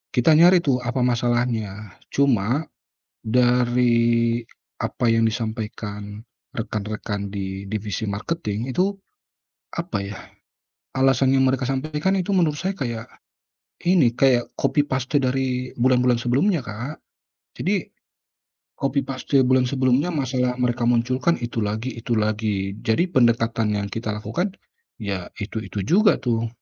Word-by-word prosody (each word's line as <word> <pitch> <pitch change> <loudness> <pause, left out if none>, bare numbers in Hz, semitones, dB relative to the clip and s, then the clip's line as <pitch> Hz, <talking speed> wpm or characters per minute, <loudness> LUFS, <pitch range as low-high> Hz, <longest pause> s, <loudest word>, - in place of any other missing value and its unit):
kita 125 +6 +4
nyari 175 +3 +6
tuh 135 -5 +2
apa 125 +1 -1
masalahnya. 120 -4 0 0.2
Cuma, 130 0 +1 0.6
dari 120 -1 +3 0.3
apa 120 - -1
yang 115 0 +3
disampaikan 110 -2 -4 0.3
rekan-rekan 100 -1 -4
di 95 -1 -4
divisi 105 +1 -3
marketing 110 +2 -3
itu, 185 +9 +1 0.8
apa 170 - -2
ya, 100 0 -6 0.8
alasan 135 0 +3
yang 135 - +4
mereka 130 -1 +1
sampaikan 150 +7 0
itu 190 +1 -1
menurut 165 -6 +2
saya, 190 +5 -2
kayak 120 -4 -4 0.8
ini, 155 -10 +4
kayak 125 -3 +3
copy-paste 145 -1 +1
dari 130 -1 -1
bulan-bulan 125 0 +3
sebelumnya 135 - +1
Kak. 120 +8 -5 0.7
Jadi 195 +3 0 0.9
copy-paste 135 -1 +1
bulan 130 0 +3
sebelumnya, 130 +5 +2
masalah 125 -2 0
mereka 120 -1 0
munculkan 130 +7 +2
itu 120 -1 -3
lagi 110 +5 -2
itu 115 0 -1
lagi. 105 -2 0
Jadi 110 +9 +2
pendekatan 115 -4 +2
yang 100 0 -2
kita 110 -1 -3
lakukan 180 - -3 0.4
ya 100 -6 -4
itu-itu 100 -1 -4
juga 205 - +5
tuh. 115 -2 0
120 Hz, 115 wpm, -23 LUFS, 110-135 Hz, 0.9 s, nyari